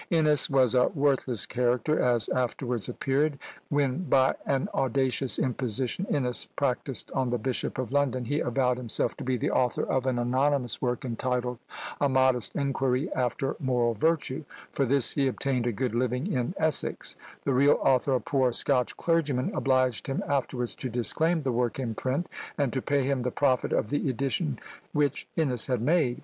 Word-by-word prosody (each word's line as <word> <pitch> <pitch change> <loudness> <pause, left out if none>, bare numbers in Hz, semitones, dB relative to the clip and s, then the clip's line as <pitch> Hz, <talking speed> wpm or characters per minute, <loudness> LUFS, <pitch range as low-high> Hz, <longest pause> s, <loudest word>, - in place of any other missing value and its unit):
Innes 155 -3 +3
was 130 -4 +3
a 125 -1 +4
worthless 135 - +1
character; 125 +5 0
as 120 -4 +2
afterwards 125 -2 -2
appeared, 140 +4 0 0.3
when 145 +3 0
by 130 -4 +3
an 135 -1 +1
audacious 130 0 0
imposition 130 - -1
Innes 125 -4 0
practised 135 -1 -2
on 130 -2 0
the 120 - 0
Bishop 125 +2 -3
of 130 -1 -3
London, 135 -3 +1
he 145 +5 -1
avowed 125 -1 +1
himself 120 -3 -1
to - - -6
be 130 0 0
the - - -1
author 125 -2 +1
of 130 0 -1
an 130 -2 +1
anonymous 130 +1 +1
work, 125 0 -1
entitled 125 0 -2 0.4
"A 140 - +2
Modest 130 -3 +2
Inquiry 135 +1 0
after 130 +1 -1
Moral 125 -4 +1
Virtue;" 155 +3 0 0.3
for 140 - 0
this 135 -2 +3
he 140 -2 +1
obtained 130 -1 -1
a - - +1
good 125 +2 -2
living 125 +3 0
in 125 +8 -1
Essex: 155 -3 -1 0.3
the 140 - 0
real 140 +3 +5
author, 135 +1 +2
a - - +2
poor 130 -2 +1
Scotch 125 +1 +1
clergyman, 150 -6 0
obliged 130 -6 +1
him 135 - -2
afterwards 130 -3 -1
to 130 - -5
disclaim 155 +8 +1
the 130 - 0
work 120 0 0
in 125 -4 -3
print, 130 +9 -2 0.3
and 140 -4 0
to 130 - -1
pay 140 +1 +1
him 135 0 0
the 125 0 -1
profit 130 -1 +1
of 110 - 0
the 145 0 0
edition 125 - -1 0.4
which 145 -2 0
Innes 130 -8 +1
had 125 -3 0
made! 135 0 +1
130 Hz, 175 wpm, -27 LUFS, 125-140 Hz, 0.4 s, real